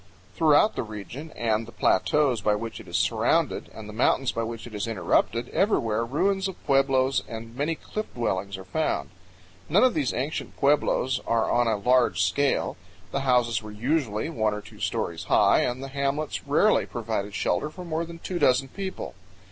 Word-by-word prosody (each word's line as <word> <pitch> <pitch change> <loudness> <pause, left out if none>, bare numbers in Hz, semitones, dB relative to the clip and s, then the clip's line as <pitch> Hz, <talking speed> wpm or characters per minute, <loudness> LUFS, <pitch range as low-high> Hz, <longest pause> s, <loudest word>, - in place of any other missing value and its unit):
Throughout 160 +6 +4
the - - -1
region 110 +8 -7
and 110 -1 0
the - - -10
plateaus 145 -5 +2
by 105 - +2
which 115 +1 -5
it - - -12
is - - -1
surrounded - - +1
and 110 -1 -10
the 105 - -8
mountains 125 +3 +2
by 115 - -2
which 115 0 -5
it 120 - -11
is 105 +1 -3
interrupted, 115 +3 +1
everywhere 115 - +1
ruins 190 +10 0
of 190 - -6
pueblos 135 -1 +3
and 115 0 -8
many 150 +5 -1
cliff 215 +6 -6
dwellings 100 -4 -2
are 95 - -9
found. 160 +10 -2 0.6
None - - +5
of 255 - +4
these 140 -5 0
ancient 135 +5 -4
pueblos 140 -2 +2
are 115 -1 +1
on 120 0 +3
a 110 -2 +1
large 125 +3 +3
scale. 140 +10 +1 0.3
The 140 - -1
houses 125 -4 +2
were 110 - -9
usually 115 0 -1
one 110 -9 0
or 105 - -5
two - - -15
stories 85 +1 -2
high 100 0 +4
and 125 +2 -1
the 135 - -6
hamlets 140 +2 -2
rarely 180 +9 +3
provided 105 -3 -3
shelter 150 - 0
for 180 +3 -9
more 165 0 -2
than 170 0 -8
two 175 +1 -4
dozen 135 +1 +3
people. 190 +5 -6
125 Hz, 185 wpm, -26 LUFS, 110-150 Hz, 0.6 s, None